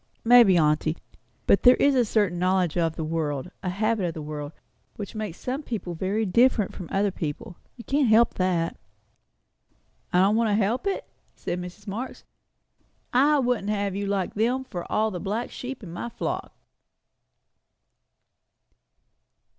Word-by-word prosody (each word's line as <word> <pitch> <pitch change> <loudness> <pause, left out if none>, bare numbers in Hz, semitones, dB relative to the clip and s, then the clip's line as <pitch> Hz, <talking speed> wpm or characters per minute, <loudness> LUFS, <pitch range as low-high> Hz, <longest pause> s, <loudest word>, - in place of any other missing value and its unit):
"Maybe, 230 -6 +7
aunty. 155 0 +2 0.5
But - - +4
there 250 0 +7
is 285 - +3
a 255 -2 +4
certain 205 -6 0
knowledge 185 -2 +1
of 165 -2 0
the 160 - -4
world, 155 0 -2
and 180 - -2
habit 215 +2 0
of 165 - -3
the 155 - -5
world, 150 -1 -6 0.4
which 205 - -7
makes 215 -6 -5
some 260 +3 -3
people 215 - -5
very 195 +6 -1
different 220 +1 +3
from 180 - -8
other 200 +1 +1
people; 165 +1 -5 0.2
you 235 - -10
can't 280 +1 +1
help 225 +2 +5
that." 180 -3 0 1.3
"I 180 - +3
don't 200 +3 +4
want 230 -1 +2
to 205 - +2
help 225 - 0
it?" 390 - -2 0.3
said 180 - -4
Mrs. 180 +3 -10
Marx. 230 +6 -6 0.9
"I 285 +4 +4
wouldn't 245 -6 0
have 200 -2 -1
you 200 0 -2
like 195 -2 -1
them, 245 +5 0
for 175 -9 -7
all 220 0 +1
the 180 - -5
black 210 +6 -3
sheep 255 -1 -7
in 175 - -8
my 175 +7 -5
flock." - - -4
200 Hz, 160 wpm, -25 LUFS, 175-235 Hz, 1.3 s, Maybe